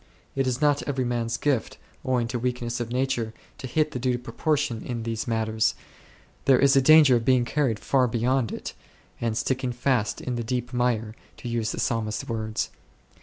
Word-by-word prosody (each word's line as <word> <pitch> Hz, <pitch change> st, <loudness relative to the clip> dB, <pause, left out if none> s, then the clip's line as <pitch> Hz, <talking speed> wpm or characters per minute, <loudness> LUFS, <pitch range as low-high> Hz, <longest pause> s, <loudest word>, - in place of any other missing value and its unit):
It 135 Hz, -1 st, +1 dB
is 125 Hz, -1 st, 0 dB
not 145 Hz, -1 st, +3 dB
every 135 Hz, -3 st, -1 dB
man's 115 Hz, -1 st, -1 dB
gift, 140 Hz, -6 st, -1 dB, 0.3 s
owing 125 Hz, -2 st, +1 dB
to 120 Hz, 0 st, -2 dB
weakness 120 Hz, -1 st, -2 dB
of 120 Hz, -1 st, -3 dB
nature, 125 Hz, -3 st, -1 dB, 0.2 s
to 130 Hz, -, -5 dB
hit 155 Hz, +4 st, +1 dB
the 125 Hz, -, -4 dB
due 125 Hz, 0 st, +1 dB
proportion 140 Hz, -1 st, -1 dB
in 120 Hz, -2 st, -4 dB
these 115 Hz, 0 st, -3 dB
matters; 110 Hz, -1 st, +1 dB, 0.7 s
there 135 Hz, -2 st, +6 dB
is 140 Hz, +1 st, +4 dB
a 135 Hz, -, +6 dB
danger 150 Hz, -2 st, +7 dB
of 115 Hz, -, -3 dB
being 125 Hz, 0 st, +3 dB
carried 130 Hz, -5 st, 0 dB
far 130 Hz, -2 st, +2 dB
beyond 120 Hz, 0 st, 0 dB
it, -, -, -6 dB, 0.5 s
and 115 Hz, -2 st, -1 dB
"sticking 130 Hz, 0 st, -1 dB
fast 120 Hz, -3 st, 0 dB
in 125 Hz, -2 st, -3 dB
the 120 Hz, -, -2 dB
deep 125 Hz, +1 st, -3 dB
mire 120 Hz, -3 st, 0 dB
9," -, -, -25 dB, 0.2 s
to 120 Hz, -, -6 dB
use 115 Hz, -2 st, -1 dB
the -, -, -5 dB
Psalmist's 110 Hz, -2 st, -1 dB
words. 110 Hz, -1 st, -2 dB
120 Hz, 190 wpm, -25 LUFS, 115-130 Hz, 0.7 s, danger